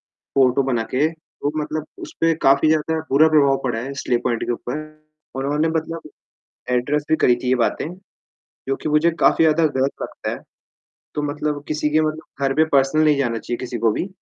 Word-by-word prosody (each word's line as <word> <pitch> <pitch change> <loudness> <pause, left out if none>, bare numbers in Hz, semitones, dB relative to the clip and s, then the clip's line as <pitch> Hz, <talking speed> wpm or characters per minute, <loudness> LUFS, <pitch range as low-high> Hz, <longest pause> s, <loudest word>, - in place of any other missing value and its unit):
Photo 135 0 +1
बना 120 -4 0
के 140 +5 +3
वो 160 -2 -6
मतलब 155 +1 -4 0.2
उसपे 165 0 +1
काफ़ी 140 +3 +5
ज़्यादा 160 +1 +1
बुरा 150 +4 +6
प्रभाव 140 -3 +4
पड़ा 120 -3 -1
है 135 +4 -5
स्ले 120 - +2
पॉइंट 120 -2 0
के - - -1
ऊपर। 125 +4 -5 0.6
उन्होंने 145 +4 0
मतलब 160 -1 -5 0.6
एड्रेस 140 +4 0
भी 160 - +4
करी 125 -5 +3
थी - - -1
ये 130 - +4
बातें, 155 - -2 0.8
जो 135 - +1
कि - - -5
मुझे 150 +3 +3
काफ़ी 165 - +4
ज़्यादा 160 +1 +4
ग़लत 135 -2 0
लगता - - -5
है। - - -4 0.8
तो 150 - -2
मतलब 145 0 -3
किसी 150 0 -1
के 155 +1 +3
मतलब 155 -2 -4
घर 135 - 0
पे 155 - +4
पर्सनल 135 +3 +3
नहीं 150 -1 +4
जाना 120 -4 0
चाहिए, 120 +2 -4
किसी 125 -1 -5
को 115 0 +3
भी 185 - -3
145 Hz, 195 wpm, -21 LUFS, 130-155 Hz, 0.8 s, बुरा